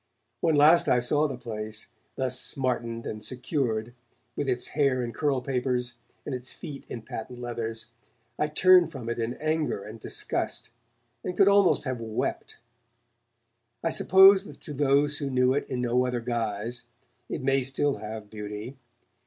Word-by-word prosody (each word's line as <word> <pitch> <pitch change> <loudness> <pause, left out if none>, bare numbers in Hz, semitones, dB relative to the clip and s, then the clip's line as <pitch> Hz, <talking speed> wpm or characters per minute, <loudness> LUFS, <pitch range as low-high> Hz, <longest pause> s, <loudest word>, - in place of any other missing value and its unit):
When 160 -2 +2
last 155 +4 +6
I - - +5
saw 145 +5 +2
the 135 -3 -5
place, 110 -3 -5 0.3
thus 130 -1 +1
smartened 120 -3 -1
and 105 0 -5
secured, 120 -3 -2 0.4
with 145 -2 -2
its 125 -1 0
hair 140 -4 +1
in 120 -1 -4
curl 135 +1 0
papers 125 -2 -1 0.3
and 145 - -4
its 125 0 -2
feet 140 -3 -9
in 115 - -6
patent 115 +2 -7
leathers, 115 -2 -4 0.5
I 150 - +2
turned 180 +2 +5
from 125 -6 -6
it 120 - -3
in 115 +2 -2
anger 155 -8 -1
and 110 +2 -9
disgust, - - -2 0.5
and 180 -1 -4
could 195 - +6
almost 200 -2 +4
have 130 -4 -3
wept. 110 -1 -3 1.3
I - - +1
suppose 190 +1 +7
that - - -9
to 150 - -8
those 145 +1 +2
who 140 - -2
knew 130 0 +3
it 145 - -2
in 125 -1 -2
no 125 +1 +2
other 125 -1 -1
guise, 115 0 -3 0.4
it - - -4
may 135 0 +3
still 135 +2 0
have 110 -1 -7
beauty. 105 +5 -7
125 Hz, 160 wpm, -27 LUFS, 115-145 Hz, 1.3 s, suppose